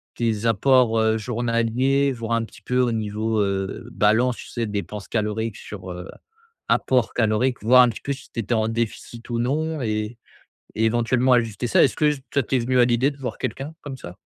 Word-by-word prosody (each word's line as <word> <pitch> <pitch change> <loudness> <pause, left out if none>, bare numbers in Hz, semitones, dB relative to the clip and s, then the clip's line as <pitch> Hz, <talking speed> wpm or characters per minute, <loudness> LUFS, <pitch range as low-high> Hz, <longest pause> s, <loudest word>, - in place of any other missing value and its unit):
tes 115 -2 -1
apports, 115 +1 +3
heu, 110 0 +3
journaliers, 120 +4 +1
voire 115 -2 -5
un 115 0 +2
petit 110 - -12
peu 125 +4 0
au 125 -1 +2
niveau, 110 0 -1
heu, 95 -1 -2
balance, 115 +4 +2
tu - - -10
sais? 120 -1 -3
Dépenses 105 0 -5
caloriques 110 0 -2
sur, 95 -3 -8
heu, 90 +1 -7 0.6
apports 125 -3 +2
caloriques, 120 +2 +1
voir 125 +3 +7
un 125 - +3
petit 110 - -7
peu 140 - -2
si 140 - -13
tu - - -4
étais 115 +3 -2
en 110 -1 +1
déficit 115 +1 -4
ou 120 -1 -1
non 155 +5 -1
et 110 0 -2 0.6
et 110 - +1
éventuellement 120 +3 +2
ajuster 115 -1 0
ça? - - +5
Est-ce 135 - +2
que 150 -1 +3 0.2
ça 140 - +3
t'es 130 - 0
venu 125 +2 +1
à 120 - +6
l'idée 125 +4 +2
de 140 - -14
voir 135 -3 -5
quelqu'un 135 +5 -5
comme 145 -2 -6
ça? 90 -7 -10
115 Hz, 200 wpm, -23 LUFS, 110-125 Hz, 0.6 s, voir